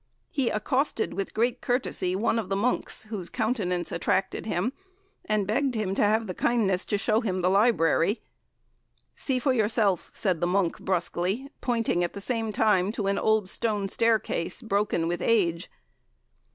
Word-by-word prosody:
He 270 -4 0
accosted, 255 +3 0
with 195 - -3
great 240 +2 +1
courtesy, 200 -7 0
one 220 +3 +1
of 215 - -5
the 195 - 0
monks 225 +3 0
whose 210 -5 -6
countenance 205 -7 -1
attracted 190 +4 -1
him, 215 +6 -1 0.5
and 215 -2 +1
begged 255 +5 0
him 210 -3 -1
to - - 0
have 220 +2 +3
the 185 - -4
kindness 200 -4 +1
to 205 - 0
show 215 +2 +1
him 185 -5 -1
the 180 - +3
library. 200 -2 +3 0.9
'See 265 -2 -1
for 260 +1 +1
yourself,' 215 -4 +1
said 185 -6 -1
the 175 - +2
monk, 180 -2 +1
brusquely, 185 - -2
pointing 230 -7 0
at 175 - -2
the - - -6
same 225 +1 -2
time 205 -2 +2
to 215 -4 -3
an 195 0 +1
old 220 -3 +2
stone 210 -1 0
staircase, 220 -6 0
broken 200 -6 0
with 175 0 -2
age. 180 -7 +1
210 Hz, 165 wpm, -27 LUFS, 185-230 Hz, 0.9 s, have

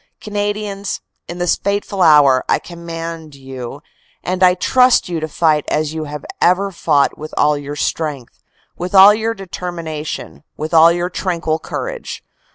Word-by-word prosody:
"Canadians, 205 -1 -3 0.3
in 175 - -7
this 175 -1 +1
fateful 200 -1 -2
hour, 145 -6 +6
I - - +4
command 165 -2 -8
you 135 +1 -8 0.4
and 185 +1 -3
I 180 -1 +6
trust 250 +6 +3
you 170 -2 -3
to 155 - -3
fight 155 -1 +1
as 155 0 -1
you 160 -1 -4
have 150 -1 -7 0.2
ever 195 +3 +3
fought 150 -5 +1
with 155 +1 -8
all 150 0 +3
your 145 0 -6
strength, 150 -4 -3 0.3
with 180 +2 -4
all 195 +2 +9
your 225 +1 -2
determination, 170 -7 -6
with 155 +2 -5
all 165 +1 +7
your 175 +1 -2
tranquil 170 -4 -2
courage. - - -6
170 Hz, 155 wpm, -17 LUFS, 150-190 Hz, 0.4 s, all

